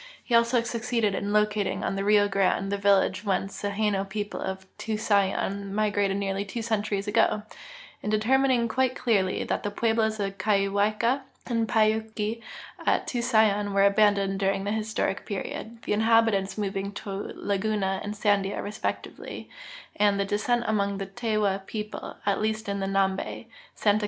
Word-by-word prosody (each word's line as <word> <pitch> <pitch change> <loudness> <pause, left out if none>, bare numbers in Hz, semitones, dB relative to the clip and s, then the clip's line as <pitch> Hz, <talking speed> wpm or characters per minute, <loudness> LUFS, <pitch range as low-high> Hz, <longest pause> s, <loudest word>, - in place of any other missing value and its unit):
He 240 - -4
also 235 +1 +4
succeeded 235 -3 0
in 200 +1 -2
locating 210 -1 +1
on - - -1
the 195 - -1
Rio 205 0 +4
Grande 195 0 +1
the 200 - 0
village 200 0 +3
whence 195 -1 -2
the 205 - -1
llano 210 -3 +1
people 205 +1 -4
of 190 0 -4
Tusayan 200 -2 0
migrated 205 -2 +1
nearl}^ 200 0 -2
two 230 +3 -4
centuries 210 -2 -1
ago; 210 0 +2 0.6
in - - -3
determining 240 +3 +3
rjuite 260 +2 +1
clearly 200 -7 +1
that - - -1
the 205 - -2
pueblos 220 0 +1
of 195 -1 -3
Kawaika 210 +5 +2 0.2
and 230 -2 0
Pai 215 -1 +4
yupki 220 0 -3 0.4
at - - +2
Tusayan 220 -5 +2
were 200 0 +4
abandoned 200 -1 +3
during 195 0 +1
the 200 - -2
historic 215 -2 -1
period, 220 +3 -6
the - - -1
inhabitants 220 -3 +3
moving 200 -1 -2
to 200 0 -5
Laguna 200 -1 -1
and 210 +1 -4
Sandia 205 -1 +1
respectively, 210 +1 -5 0.4
and 205 -1 +3
that 200 0 -1
de.scent 235 +3 +1
among 200 -2 0
the 195 - -3
Tewa 205 -2 -1
people, 210 -1 -5
at 200 0 +1
least 220 0 -1
in 200 0 -2
Xambe, 195 +2 -1 0.3
Santa 210 0 +3
205 Hz, 155 wpm, -27 LUFS, 195-220 Hz, 0.6 s, also